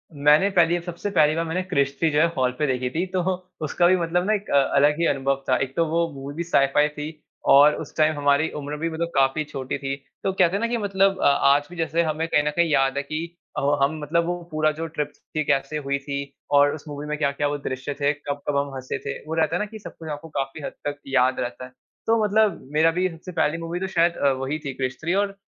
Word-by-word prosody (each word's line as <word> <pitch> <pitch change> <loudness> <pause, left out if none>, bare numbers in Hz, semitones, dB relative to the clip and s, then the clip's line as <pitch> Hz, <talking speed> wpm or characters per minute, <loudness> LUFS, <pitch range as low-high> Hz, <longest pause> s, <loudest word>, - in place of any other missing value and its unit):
मैंने 150 +7 +4
पहली 175 0 +4
सबसे 175 +4 -4
पहली 155 -4 +4
बार 165 0 -1
मैंने 165 +3 -1
क्रिश 140 -6 0
थ्री 165 - +3
जो 150 - +2
है 165 - +6
हॉल 125 -1 +2
पे 150 - +2
देखी 125 -1 -1
थी। 170 +7 -1
तो 185 - +1 0.4
उसका 175 +4 +2
भी 185 - +5
मतलब 175 +1 0
ना 215 - +3
एक 205 -1 -3
अलग 140 +1 +4
ही 170 - +2
अनुभव 135 0 0
था। 130 - +4
एक 135 0 -7
तो 165 - +2
वो 170 +1 +1
मूवी 140 +1 -7
भी 170 - -2
साइ-फाइ 145 -3 +3
थी 150 0 -6 0.5
और 145 +2 +7
उस 155 - -8
टाइम 155 0 +3
हमारी 145 +2 +2
उम्र 145 0 -5
भी 165 +2 -2
मतलब 165 +1 -2
काफ़ी 135 +3 +2
छोटी 135 -2 -5
थी 135 0 -3 0.3
तो 195 - +1
कहते 185 0 +3
है - - 0
ना 230 - +1
कि 240 0 -1
मतलब 195 -2 +1
अ, - - +2
आज 140 +1 +4
भी 180 - -10
जैसे 165 +1 +1
हमें 160 +1 -1
कहीं 150 - +2
न - - +4
कहीं 170 -1 +3
याद 135 -1 +2
है 140 - 0
कि 155 +3 -4 0.3
अ, - - 0 0.2
हम 155 +3 0
मतलब 165 +3 +1
वो 175 0 -3
पूरा 155 0 +2
जो 165 - -3
ट्रिप 150 -2 -3 0.2
थी 155 - +1
कैसे 135 +3 0
हुई 140 - +1
थी 140 0 -4 0.3
और 145 0 +5
उस 155 - -11
मूवी 145 0 -6
में 150 0 -2
क्या-क्या 145 -1 0
वो 145 0 -2
दृश्य 130 +2 -3
थे 145 - +3
कब-कब 145 0 -3
हम 140 -1 -1
हँसे 130 -1 -4
थे। 140 - -3
वो 160 - -3
रहता 160 0 +1
है - - 0
ना 210 - 0
कि 220 +1 -10
सब - - -10
कुछ 160 -1 -8
आपको 150 +2 -6
काफ़ी 135 +3 -4
हद - - -4 0.2
तक 145 - -3
याद 130 -1 +2
रहता 120 +1 -4
है। 125 - -14 0.4
तो 225 -1 +3
मतलब 210 -1 +2
मेरा 160 +2 +4
भी 180 +2 +1
सबसे 170 +2 -10
पहली 165 -1 +1
मूवी 165 +1 -4
तो 190 - -2
शायद 170 -2 +2
अ, 140 - +3
वही 135 +3 -3
थी 140 -2 -5
क्रिश 130 -1 -3
थ्री 170 +3 0
और 200 -1 -5
150 Hz, 260 wpm, -24 LUFS, 140-170 Hz, 0.5 s, और